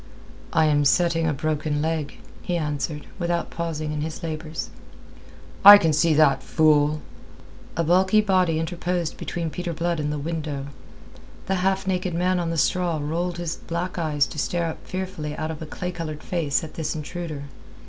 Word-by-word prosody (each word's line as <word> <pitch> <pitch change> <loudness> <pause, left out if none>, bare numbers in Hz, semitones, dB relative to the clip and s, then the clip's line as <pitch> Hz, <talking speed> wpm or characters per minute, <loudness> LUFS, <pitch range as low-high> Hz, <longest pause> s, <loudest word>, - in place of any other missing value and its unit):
"I 160 - +4
am 145 -1 +3
setting 165 +2 +3
a - - +2
broken 150 0 -1
leg," 155 -1 -2 0.2
he 175 - -1
answered, 150 -1 -3
without 170 -1 -1
pausing 160 -2 -3
in 150 -1 -2
his 160 +3 -5
labours. 160 0 -5 0.9
"I 205 +1 +13
can 165 -6 +1
see 155 +1 +3
that, 155 -2 +4
fool." 155 -1 +3 0.8
A 170 - +2
bulky 190 +5 +4
body 185 -6 +2
interposed 175 0 -2
between 165 -2 -3
Peter 175 0 -4
Blood 170 +1 -1
and 150 0 -1
the 150 - -2
window. 150 -2 -3 0.8
The 190 - 0
half 190 +1 +1
naked 185 -2 -1
man 180 +1 +1
on 170 -1 -1
the 165 - -2
straw 175 +1 +1
rolled 170 +4 -2
his 170 -1 -3
black 175 +2 -4
eyes 150 -3 +2
to 150 - -7
stare 170 +3 0
up - - -9
fearfully 185 -5 -4
out 155 - -2
of 160 - -8
a 160 - -6
clay 180 +4 -4
coloured 160 -4 -6
face 165 -6 0
at 155 - -8
this 155 -1 -3
intruder. 155 -1 -5
165 Hz, 175 wpm, -24 LUFS, 150-175 Hz, 0.9 s, I